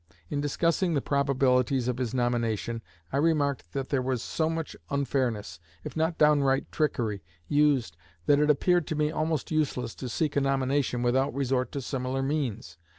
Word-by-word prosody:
In 145 - 0
discussing 165 +4 +1
the - - +3
probabilities 135 -2 +2
of 125 0 -1
his 125 -4 -1
nomination, 115 -2 -1 0.3
I - - +1
remarked 145 - +1
that 135 -1 -3
there 135 -3 +1
was 125 -2 -1
so 160 -1 -1
much 165 -1 -4
unfairness, 120 - -1 0.2
if - - -7
not 160 +1 0
downright 145 -3 +3
trickery, 115 -10 -1 0.3
used 145 - +2 0.3
that 145 0 +4
it 150 0 +3
appeared 175 +3 +3
to 155 - -2
me 150 0 +1
almost 155 -1 -1
useless 135 -7 -1
to 130 - -6
seek 150 +5 -1
a 140 - +3
nomination 135 -2 0
without 130 +1 +1
resort 130 -2 0
to 140 - -3
similar 130 0 -2
means. 120 - -3
135 Hz, 165 wpm, -28 LUFS, 125-150 Hz, 0.3 s, that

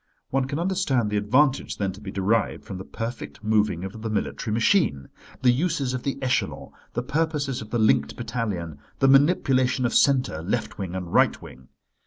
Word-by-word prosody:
One 135 0 +1
can 140 +2 -3
understand 165 - 0
the 105 - +1
advantage 130 +7 +2
then 100 -2 -1
to 95 +3 -12
be 100 - -7
derived 100 +4 0
from 100 -4 -7
the - - -6
perfect 115 +2 -6
moving 105 -5 +1
of 105 +4 -7
the 110 - -3
military 110 0 -2
machine; 110 - +2 0.3
the 125 - +6
uses 140 -1 0
of 130 - -3
the 140 - -2
echelon, 130 - -1 0.2
the 120 - -1
purposes 150 -2 -1
of 110 - -9
the 120 - -1
linked 110 -1 +2
battalion, 105 -10 -4 0.2
the 135 - +3
manipulation 135 -3 +3
of 120 - 0
centre, 130 - +3
left 90 +4 -3
wing 95 -2 -4
and 90 -2 -5
right - - +4
wing. 65 0 -13
115 Hz, 185 wpm, -25 LUFS, 105-135 Hz, 0.3 s, the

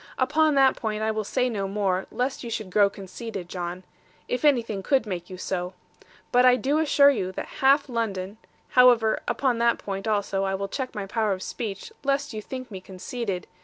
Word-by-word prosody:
Upon 300 +3 +3
that 270 -1 +5
point, 215 -1 -3
I 220 - +1
will 215 0 -2
say 250 +4 0
no 205 -5 -2
more, 195 -2 -1
lest 260 +2 -2
you 235 - -5
should 215 -4 -4
grow 200 +1 +5
conceited, 195 -1 -7
John; 180 0 -5 0.4
if 250 - -2
anything 235 -9 +2
could 265 +3 +2
make 180 -4 -5
you 185 - -8
so. 180 0 -3 0.6
But 245 0 +5
I 250 0 +7
do 280 +4 +1
assure 285 -2 +5
you 195 -8 -2
that - - -7
half 275 +2 +5
London 215 -4 -3 0.3
however, 245 -3 +5
upon 255 -4 +1
that 235 0 +3
point 195 +1 -5
also 200 -2 0
I 195 0 0
will 200 +1 -3
check 260 +2 -4
my 205 -2 -3
power 215 0 0
of 185 - -5
speech, 220 - -5
lest 280 -1 0
you 215 - -4
think 255 +2 -7
me 190 -2 -7
conceited. 190 +1 -5
220 Hz, 200 wpm, -25 LUFS, 195-255 Hz, 0.6 s, I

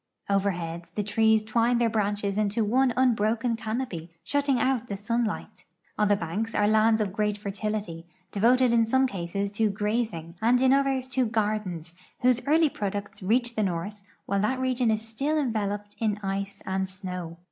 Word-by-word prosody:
Overhead 175 -4 -1
the 210 - 0
trees 220 +1 +3
twine 230 +2 +2
their 235 -1 +3
branches 205 -2 -1
into 215 +1 +1
one 255 +4 +3
unbroken 230 -1 +2
canopy, 220 -7 -4
shutting 285 -3 +1
out 250 -1 +1
the 200 - -4
sunlight. 215 -2 -3 0.3
On 210 - +2
the 205 - +4
banks 200 +6 -3
are 205 - +3
lands 220 +1 +4
of 195 -3 -2
great 210 -1 0
fertility, 200 -4 -4 0.2
devoted 240 +4 +4
in 230 -1 +4
some 260 +3 +3
cases 200 -2 -3
to 215 +1 +1
grazing 205 -5 -2
and 240 +3 +4
in 260 0 +4
others 270 -2 +1
to 255 -2 +1
gardens, 210 -7 -2 0.3
whose 250 -1 +3
early 315 +2 +5
products 205 -6 -4
reach 235 +5 +1
the 220 - -1
north 200 +2 -2 0.2
while 200 0 0
that 255 +5 0
region 255 -2 +1
is 220 0 0
still 275 +8 -1
enveloped 205 -6 -2
in 215 -2 0
ice 195 +1 -3
and 190 0 -1
snow. 180 -3 -6
215 Hz, 170 wpm, -27 LUFS, 200-240 Hz, 0.3 s, early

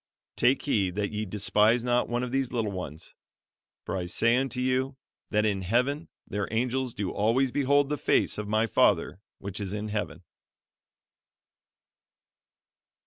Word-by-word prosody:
'Take 125 +3 +2
heed 100 -10 0
that 100 0 -1
ye 105 0 -3
despise 105 +4 +3
not 125 0 +1
one 120 +1 -1
of 125 - -4
these 135 -1 0
little 115 -4 -1
ones; 85 -5 -7 0.7
for - - -3
I 90 -2 -3
say 115 +6 +2
unto 130 -1 -1
you, 130 +1 0 0.3
That 105 -1 +2
in 100 -3 0
heaven 125 - 0 0.2
their 100 -1 -3
angels 125 +2 -1
do 100 -3 -2
always 120 +5 +2
behold 140 +1 +2
the 150 -2 -2
face - - +2
of 105 - -4
my 110 +2 +2
Father 100 -3 +2 0.2
which 100 +1 -6
is 100 -1 -4
in 105 0 -4
Heaven.'" 95 -5 -4
115 Hz, 150 wpm, -28 LUFS, 100-130 Hz, 0.7 s, despise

